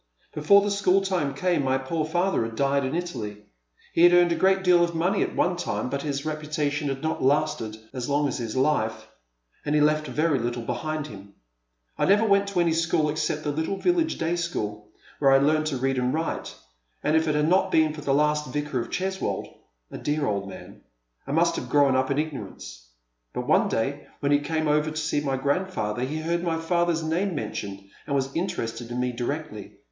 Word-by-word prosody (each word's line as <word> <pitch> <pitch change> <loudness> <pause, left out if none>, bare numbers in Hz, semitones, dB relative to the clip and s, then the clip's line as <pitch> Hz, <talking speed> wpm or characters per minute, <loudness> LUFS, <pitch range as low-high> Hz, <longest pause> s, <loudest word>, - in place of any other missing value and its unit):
Before 200 +7 +5
the 205 - 0
school 195 -1 +3
time 175 -8 -1
came 175 0 +1
my 130 0 +2
poor 155 +4 -2
father 175 0 +1
had 115 0 -5
died 140 +2 +1
in 130 +4 -2
Italy. 115 -13 -4 0.5
He - - +2
had 175 0 +8
earned 175 -1 +5
a - - +2
great 190 +2 +3
deal 180 -2 +5
of 170 -1 -1
money 180 +5 +1
at - - -1
one 180 - +2
time, 150 -6 -3
but 140 - -2
his 140 -1 -3
reputation 150 -1 -2
had 135 +1 -4
not 160 - -1
lasted 135 -6 +1 0.2
as 125 -1 -4
long 145 +1 +2
as 130 - -3
his 115 -1 -4
life, 130 -5 0 0.6
and 150 0 0
he - - +4
left 155 +1 +2
very 155 -3 +1
little 120 0 -3
behind 155 +4 -3
him. 100 -5 -11 0.6
I - - +3
never 205 +3 +4
went 200 -1 +3
to 200 -3 -1
any 170 -2 +3
school 165 -2 +1
except 155 0 -2
the 150 - -1
little 160 +6 -2
village 340 - +1
day 165 +1 0
school, 105 -12 -3 0.3
where 140 - +4
I 135 - +7
learned 155 +3 +2
to 140 -4 -1
read 135 0 0
and 125 0 +1
write; 160 +3 -3 0.5
and 150 - +2
if 160 0 +2
it 150 - +1
had 150 0 +2
not 185 +2 +3
been 155 -1 +3
for 150 - -8
the 145 - -1
last 150 0 +1
Vicar 145 -2 -2
of 115 - -4
Cheswold 190 +1 -2 0.2
— - - -45
a - - -7
dear 150 0 -1
old 100 -4 -2
man^ 95 - -11 0.5
I - - -4
must 170 +3 +2
have 125 - -5
grown 140 -1 +4
up 130 0 +1
in 140 - 0
ignorance. - - -5 0.5
But - - -3
one - - +3
day 135 +6 -2
when 140 -1 0
he 145 - +5
came 155 +1 -1
over 150 +1 +2
to 155 - -6
see 155 -1 0
my 135 -2 -1
grandfather 140 - -1
he 135 +5 -2
heard 170 +2 -1
my 170 -2 -1
father's 170 0 0
namie 175 +4 -1
men 110 -6 -3
tioned, 100 -1 -6 0.2
and 140 - -1
was 135 0 -1
interested 120 -10 -3
in 120 +1 -3
me 125 0 0
directly. 120 -3 -5
150 Hz, 215 wpm, -25 LUFS, 130-170 Hz, 0.6 s, had